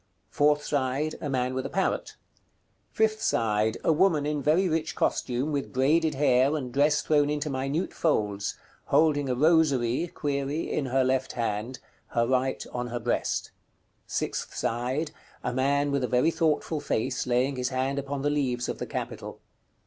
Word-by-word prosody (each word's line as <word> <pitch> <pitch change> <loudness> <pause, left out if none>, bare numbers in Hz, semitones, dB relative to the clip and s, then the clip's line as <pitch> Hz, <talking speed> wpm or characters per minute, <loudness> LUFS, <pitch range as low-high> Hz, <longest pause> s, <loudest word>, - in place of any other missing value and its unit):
Fourth 150 0 +3
side. 145 +2 -1
A 150 - -3
man 130 -1 0
with 130 0 -2
a - - -4
parrot. - - -1 0.8
Fifth 215 0 +1
side. 110 0 +1
A 160 - +4
woman 160 -3 +3
in 150 -1 -1
very 160 +7 +3
rich 160 -1 -1
costume, 130 +5 0
with 140 -2 -2
braided 150 +4 +2
hair, 135 +1 +3
and 125 -4 -5
dress 150 +1 +3
thrown 145 -2 +3
into 150 0 -2
minute 135 +6 -2
folds, 105 -10 0 0.3
holding 145 -3 +3
a 125 - +1
rosary(?) 150 -1 +2 0.6
in 140 - -1
her 130 +1 +2
left 130 0 0
hand, 115 +1 -2 0.3
her 115 0 +1
right 130 +1 0
on 125 0 -2
her 120 0 -4
breast. 110 - -1 0.6
Sixth - - -3
side. 125 +7 -1 0.3
A 125 - -2
man 140 +2 +1
with 140 -2 0
a - - +1
very 125 +7 +3
thoughtful 160 -1 0
face, 130 -3 -1
laying 125 +3 +1
his 125 0 -1
hand 135 +1 -1
upon 140 0 -4
the 145 - +2
leaves 130 -4 0
of - - -4
the - - -4
capital. - - -5
140 Hz, 165 wpm, -27 LUFS, 125-150 Hz, 0.8 s, A